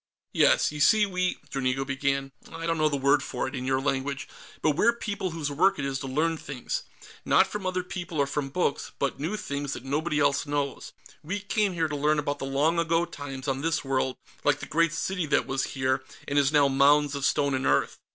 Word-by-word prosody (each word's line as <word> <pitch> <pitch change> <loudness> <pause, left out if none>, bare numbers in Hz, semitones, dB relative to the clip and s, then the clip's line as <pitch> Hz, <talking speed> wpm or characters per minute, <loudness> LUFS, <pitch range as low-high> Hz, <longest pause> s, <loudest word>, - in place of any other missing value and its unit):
"Yes. - - +4
You 150 - -7
see, 215 +8 +5
we...." 185 -2 -1
Dranigo 135 0 0
began. 135 0 -1 0.2
"I 165 0 -6
don't 165 -1 0
know 155 0 +3
the 145 - -1
word 140 +1 +3
for 130 -2 -3
it, 130 - -7
in 130 -2 -4
your 130 0 +2
language, 135 0 -2 0.4
but 155 - +4
we're 225 +11 +3
people 200 -4 -3
whose 160 -3 -3
work 185 +7 +3
it 140 - -2
is 135 -1 -2
to 135 - -5
learn 160 +5 0
things. - - -4 0.4
Not - - +5
from 205 -3 -5
other 185 0 -1
people 180 -3 -6
or 140 - +3
from 140 0 -3
books, 145 0 -1
but 140 -2 -1
new 170 +9 -2
things, 145 -7 -3
that - - -7
nobody 150 +3 0
else 140 0 +2
knows. 145 -1 -2 0.3
We 185 +7 -3
came 205 -1 0
here 165 -2 0
to 150 - -4
learn 150 +2 +2
about 145 -1 -2
the 135 - -4
long 150 +5 +2
ago 165 0 +2
times 145 -4 -7
on 135 0 -1
this 165 -2 0
world, 130 -1 0 0.3
like 145 0 +2
the - - -6
great 165 0 +2
city 175 +1 -2
that 150 - +2
was 135 0 -1
here 130 0 0 0.2
and 145 +1 +2
is 140 0 +3
now 145 -2 +5
mounds 145 +2 +4
of 140 -1 -4
stone 140 0 +2
and 130 0 0
earth. - - +1
145 Hz, 225 wpm, -27 LUFS, 135-165 Hz, 0.4 s, see